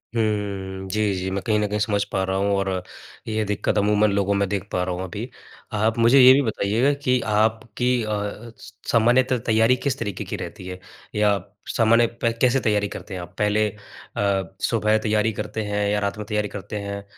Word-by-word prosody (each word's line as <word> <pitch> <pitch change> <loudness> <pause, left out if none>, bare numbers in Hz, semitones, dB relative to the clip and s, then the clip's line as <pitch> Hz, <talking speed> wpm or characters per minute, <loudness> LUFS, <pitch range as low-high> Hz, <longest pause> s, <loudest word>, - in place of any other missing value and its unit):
हुँ। 100 -3 -2
जी, 105 0 +1
जी। 95 +1 -3
मैं 100 - -2
कहीं 110 -2 +1
न 105 - +1
कहीं 105 +1 -2
समझ 105 -1 +1
पा 95 - 0
रहा 95 0 -1
हूँ 100 +1 +1
और 100 0 0 0.6
ये 110 -1 0
दिक्कत 105 +1 -1
अमूमन 105 +1 +3
लोगों 100 0 +1
में 100 0 +1
देख 100 0 -3
पा 90 - 0
रहा 90 -1 -2
हूँ 90 - -4
अभी। 105 +7 -6 0.4
आप 110 +2 +1
मुझे 120 +4 +6
ये 130 0 +9
भी 140 - +4
बताइएगा 115 +3 +1
कि 125 0 +3
आपकी 110 +3 +1
अ 110 - -4
अ, 105 +2 -4
स 110 - -13 0.2
सामान्यत 120 +3 +4
तैयारी 115 +2 +4
किस 140 -5 0
तरीके 100 -5 -3
की - - -4
रहती 90 - -8
है? 90 0 -7 0.4
या 105 -1 +3 0.4
सामान्य 115 +1 +5
पे 115 - +2
कैसे 130 +1 +4
तैयारी 105 -2 +1
करते 100 - -8
हैं 90 - -4
आप? 90 - -11
पहले 105 +1 +2
अ, 100 -2 -4
सुबह 110 -1 +2
तैयारी 110 0 +1
करते 105 +1 -4
हैं 105 0 -1
या 105 0 +1
रात 100 0 -2
में 105 - -5
तैयारी 105 -1 0
करते 100 +1 -6
हैं, 100 0 -5
105 Hz, 205 wpm, -23 LUFS, 100-110 Hz, 0.6 s, ये